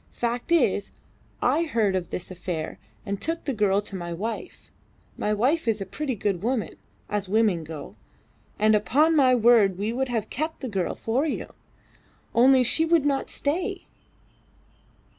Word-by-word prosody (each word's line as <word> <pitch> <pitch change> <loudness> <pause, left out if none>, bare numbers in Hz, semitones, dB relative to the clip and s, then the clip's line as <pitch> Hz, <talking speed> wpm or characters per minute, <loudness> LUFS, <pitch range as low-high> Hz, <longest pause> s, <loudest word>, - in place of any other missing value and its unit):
Fact 240 +5 -3
is, 340 - +2 0.5
I 335 - +2
heard 220 -10 +1
of 180 -2 -2
this 180 - -5
affair 175 -3 -5 0.3
and 200 -2 -4
took 330 +2 -3
the 275 - -1
girl 205 -3 +2
to 205 -1 -7
my 175 -2 -5
wife. 220 - -6 0.4
My 210 - -1
wife 255 +9 +1
is 220 -2 +2
a 195 - -4
pretty 265 +6 -3
good 195 -3 -1
woman 235 0 -1 0.3
as 205 -2 -3
women 210 -5 +2
go 155 -1 -9 0.6
and 215 +1 +4
upon 270 - +3
my 260 -4 +5
word 225 -5 +5
we 210 +4 -2
would 265 +1 -1
have 225 -3 -2
kept 315 +4 -3
the 265 - -3
girl 190 -4 -2
for 255 +7 0
you, - - -4 0.8
only 255 +2 +6
she 315 +6 +2
would 325 -2 +3
not 280 -2 0
stay. 365 +6 -2
225 Hz, 160 wpm, -25 LUFS, 200-280 Hz, 0.8 s, only